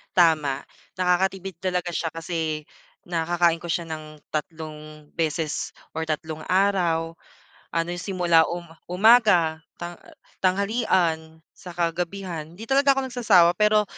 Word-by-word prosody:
Tama, 155 -6 +3 0.3
nakakatipid 185 0 0
talaga 180 -1 -1
siya 165 0 -2
kasi 160 -2 -3 0.4
nakakain 170 0 +1
ko 175 - -8
siya 170 -1 -1
ng 155 -1 -8
tatlong 155 -1 -6
beses 160 -1 -1 0.2
or 160 - -1
tatlong 155 0 -4
araw, 175 -4 +1 0.6
ano 165 0 0
yung 175 0 -4
simula 175 -4 +4 0.4
umaga, 180 -4 +5 0.2
tang 175 0 -6 0.4
tanghalian, 185 -5 +1 0.2
saka 175 -1 -2
gabihan, 175 -2 -5
'di 210 +5 -9
talaga 275 +1 +4
ako 270 -1 -2
nagsasawa 205 -9 +5
pero. 210 0 +4
170 Hz, 115 wpm, -24 LUFS, 160-190 Hz, 0.6 s, umaga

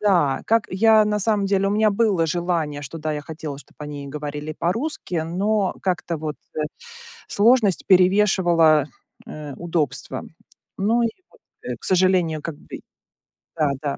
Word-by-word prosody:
Да, 175 -10 +2
как 225 -1 +2
я 215 +3 +5
на 210 0 0
самом 205 -1 +1
деле, 195 0 +1
у - - -1
меня 215 +1 +3
было 200 -5 +2
желание, 160 -3 -1
что 145 +4 -7
да, 155 0 -2
я 150 - -3
хотела, 155 -3 -7
чтоб - - -16
они 145 -1 -7
говорили 150 +1 -5
по-русски, 225 - -2
но 195 +3 0
как-то 175 -2 -1
вот, 155 -1 -5 0.2
э, 155 - -1 0.7
сложность 215 -3 +3
перевешивала, 180 -5 +4 0.4
э, 150 -2 -8
удобства. 160 -6 -2 0.5
Ну 225 +5 +2
и 230 - +2 0.2
вот, - - -23 0.2
э, - - -4
к - - -15
сожалению, 180 -4 +2
как 160 -2 -5
бы - - -10 0.8
Да-да. 145 -2 -1
175 Hz, 150 wpm, -22 LUFS, 150-205 Hz, 0.8 s, я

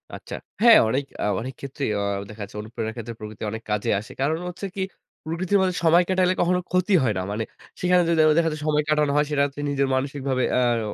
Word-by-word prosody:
আচ্ছা। - - -8 0.3
হ্যাঁ, 235 -1 +9
অনেক 135 +5 0 0.2
আ - - +1 0.2
অনেক 130 +3 -5
ক্ষেত্রেই 140 -1 -4
অ - - -1 0.3
দেখা 110 0 -10
যাচ্ছে 100 +1 -9
অনুপ্রেরণার 110 0 -5
ক্ষেত্রে 115 -1 -6
প্রকৃতি 105 0 -8
অনেক 110 +1 -5
কাজে 105 -1 0
আসে। 110 +5 -11
কারণ 155 +4 +1
হচ্ছে 180 +3 -7
কি 195 - -3 0.4
প্রকৃতির 175 +5 0
মধ্যে 185 -1 +1
সময় 170 +2 +5
কাটালে 185 -1 +3
কখনো 180 +1 +2
ক্ষতি 185 +2 +2
হয় 115 -4 +2
না। - - -1
মানে 110 +2 -2 0.4
সেখানে 180 0 +4
যদি 170 - +2
দেখো 155 -1 +6
দেখা 165 -1 +3
যায় 155 - -6
সময় 150 -1 +2
কাটানো 150 -1 +2
হয়, 150 0 +3
সেটা 140 -1 +2
হচ্ছে 145 +1 -6
নিজের 140 -1 +1
মানসিকভাবে 135 -1 -1
অ্যা 125 - +3
আর 115 - 0
145 Hz, 225 wpm, -24 LUFS, 120-170 Hz, 0.4 s, হ্যাঁ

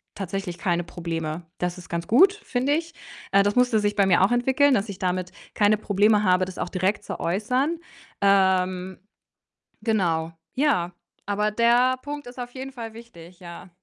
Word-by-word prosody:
tatsächlich 195 -2 -4
keine 175 -1 0
Probleme. 165 -1 -5
Das 180 0 -2
ist 175 - -13
ganz 170 0 -3
gut, 380 - +6
finde 280 -9 -1
ich. 330 +1 -2 0.4
Äh, 200 0 +5
das 205 +2 0
musste 245 -3 +3
sich 205 0 0
bei 200 -2 +3
mir 190 - +4
auch 200 - +3
entwickeln, 265 +3 +3
dass 205 0 -1
ich 195 - -7
damit 185 0 -2 0.2
keine 210 0 +3
Probleme 210 +1 +2
habe, 185 -1 +3
das 185 - -10
auch - - -3
direkt 190 +3 -1
zu - - -6
äußern. 250 - 0 0.4
Ähm, 190 -2 +2 0.8
genau. 170 -7 0 0.2
Ja, 255 - +1 0.3
aber 210 +1 0
der 240 +3 +3
Punkt 290 -2 -6
ist 250 +1 -10
auf 245 0 -6
jeden 265 +1 -7
Fall 230 -3 -8
wichtig, 180 -7 -14
ja. 175 +1 -10
205 Hz, 175 wpm, -24 LUFS, 180-245 Hz, 0.8 s, gut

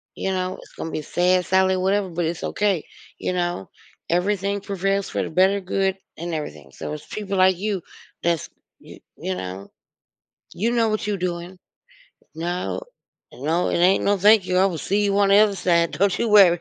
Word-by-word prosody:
you 190 - -2
know? 185 0 -2
It's - - -17
gonna 160 - -5
be 155 - -3
sad, 180 +3 +1
sadly, 190 0 +3
whatever, 190 +1 +1
but 170 +1 -2
it's 165 +1 -3
okay, 200 -6 0 0.3
you - - -2
know? 175 - -2 0.4
Everything 200 +3 0
prevails 195 0 -1
for - - -1
the - - -4
better 190 +4 +3
good, 190 0 -1 0.2
and 170 +1 -5
everything, 75 - -6
so, 150 - -6
it's 150 - -8
people 200 -2 -4
like 185 -1 +4
you 200 -2 -2 0.4
that's 170 -3 0 0.3
y - - -14 0.2
you 95 - -3
know? 95 +1 -6 0.9
You 225 +5 0
know 230 -2 +2
what 215 0 -1
you 205 -1 0
doing. 175 +1 -4 0.8
No, 175 - -3 0.5
no, 155 +8 0
it - - 0
ain't 180 +3 +4
no 200 0 +2
"Thank 205 0 +5
you." 180 - +1
I 190 - +5
will 170 -4 -3
see 200 +6 0
you 200 0 +1
on 200 -1 +4
the 200 - +6
other 210 -2 +4
side, 170 -3 +2
don't 200 +1 +1
you 235 - +1
worry. 185 -5 +7
185 Hz, 190 wpm, -23 LUFS, 170-200 Hz, 0.9 s, worry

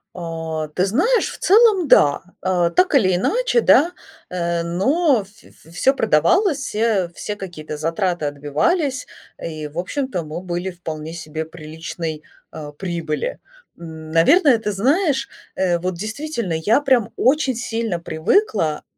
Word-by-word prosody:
А, 165 -2 -4
ты 180 +5 0
знаешь, 425 - +2
в - - -10
целом, 410 -4 +4
да, 145 - +5 0.2
а, 180 -2 +1
так 365 - +2
или 185 -9 +4
иначе, - - +1
да, 335 -4 +5 0.4
э, 170 -1 -1
но 250 - +2
в 195 - -18 0.4
в 160 - -17
всё 220 +10 +2
продавалось, 280 - +2
и, - - -1
э, 210 -6 +1
все 210 +5 -5
какие-то 170 -6 -7
затраты 165 +1 -1
отбивались, 155 - -1 0.3
и, 155 -2 -5
в 150 +2 -13
общем-то, 250 - -3
мы 155 +3 -6
были 180 +1 -4
в 175 - -18
вполне 160 -1 -6
себе 160 -1 -5
приличной, 160 0 -7 0.3
а, 150 -2 -8
прибыли. 170 - -4 0.4
Н 160 -2 -9
наверное, 270 - +5
ты 215 -1 -3
знаешь, 270 - +1 0.3
э, 180 -2 +1
вот 180 +1 -3
действительно, 220 - -4
я 205 - +2
прям 260 -6 +2
очень 270 -1 +2
сильно 225 -5 -2
привыкла 165 - 0
185 Hz, 145 wpm, -20 LUFS, 160-270 Hz, 0.4 s, да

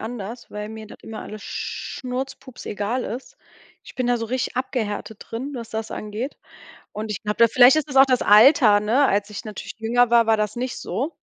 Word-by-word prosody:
anders, 225 +1 -7
weil 210 0 -6
mir 220 0 -9
das - - -13
immer 220 -1 -8
alles 215 -1 -9
schnurz-pups-egal 250 -3 -5
ist. 260 - -7 0.5
Ich - - -13
bin 255 -1 -1
da 245 - +2
so 230 -1 -4
richtig 250 +1 -3
abgehärtet 220 -5 -3
drin, 260 +6 -5
was 235 -3 -6
das 220 0 -4
angeht 215 +6 -5 0.6
und 215 +1 -5
ich 190 - -4
glaube, 210 0 -2
da 230 - +6
vielleicht 245 +4 +7
ist 310 -1 -1
es 270 - -6
auch 270 - +8
das 255 -2 +1
Alter, 215 -1 +7
ne, 230 +7 +3
als 205 -3 +1
ich 210 +2 -7
natürlich 210 -2 -7
jünger 235 +2 +2
war, 235 -1 +5
war 220 0 +3
das 210 0 -1
nicht 250 +1 -3
so. 285 +7 -4
230 Hz, 200 wpm, -23 LUFS, 215-255 Hz, 0.6 s, auch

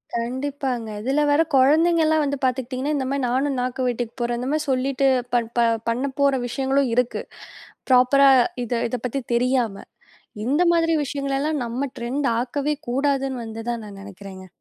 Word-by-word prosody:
கண்டிப்பாங்க. 255 0 -3
இதுல 270 +5 +1
வேற 290 - +4
கொழந்தைங்கலாம் 315 +3 +4
வந்து 285 0 -1
பாத்துக்கிட்டீங்கன்னா, 260 +3 -1
இந்த 265 - -1
மாரி 275 -1 -1
நானும் 265 +3 0
நாக்கு 255 +1 -3
வெட்டிக்க 240 -1 -2
போறேன். 240 0 -1
இந்த 250 - -4
மாரி 310 0 0
சொல்லிட்டு 270 +1 +1 0.3
பட் 235 -2 +1
ப - - +4 0.3
பண்ண 250 +4 -1
போற 280 -1 +4
விஷயங்களும் 270 +1 0
இருக்கு. 250 -1 0 0.7
ப்ராப்பரா 260 +2 +6 0.3
இத 240 0 -3 0.2
இத 250 - -3
பத்தி 270 +3 -2
தெரியாம, 240 -4 0 0.6
இந்த 290 +7 +2
மாதிரி 330 -1 +2
விஷயங்களெல்லாம் 280 +2 -2
நம்ம 245 +4 -3
ட்ரெண்ட்டாக்கவே 260 +3 -1
கூடாதுன்னு 270 -1 0
வந்துதான் 225 0 -5
நான் 200 -1 -10
நெனைக்கிறேங்க. 195 -1 -10
260 Hz, 145 wpm, -23 LUFS, 240-280 Hz, 0.7 s, ப்ராப்பரா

